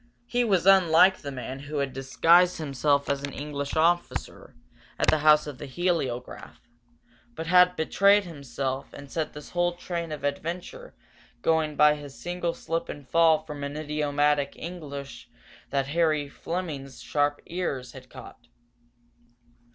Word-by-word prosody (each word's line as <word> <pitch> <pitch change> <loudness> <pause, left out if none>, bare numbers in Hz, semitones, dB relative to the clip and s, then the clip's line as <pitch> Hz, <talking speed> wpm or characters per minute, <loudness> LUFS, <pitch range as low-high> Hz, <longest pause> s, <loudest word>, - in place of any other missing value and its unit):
He 245 0 0
was 195 -6 +1
unlike 190 -1 +6
the 140 - -7
man 130 0 -6
who 145 +2 -6
had 140 -2 -1
disguised 165 +7 +4
himself 140 -1 0
as 140 -1 -1
an 140 0 -5
English 140 -1 -5
officer, 170 +2 -1 0.4
at - - +2
the 155 - +3
house 150 0 +5
of 145 -3 -8
the 145 - -7
heliograph, 135 -5 -3 0.8
but 160 - -5
had 180 +1 +5
betrayed 200 +5 +4
himself 135 -5 -5
and 140 -1 -11
set 160 -2 -3
this 150 0 -10
whole 175 0 +1
train 170 -2 -5
of 150 -2 -6
adventure 175 - -5 0.5
going 160 -2 +1
by 150 0 +6
his 145 -2 -10
single 175 -1 -3
slip 165 0 -3
and 145 -2 -8
fall 160 +1 +4
from 150 -2 -7
idiomatic 145 -1 0
English 145 -5 -8 0.4
that 140 -1 0
Harry 155 -2 +1
Fleming's 140 -4 -5
sharp 145 0 0
ears 145 -8 -4
had 130 -1 -13
caught. 120 - -13
150 Hz, 145 wpm, -26 LUFS, 140-170 Hz, 0.8 s, unlike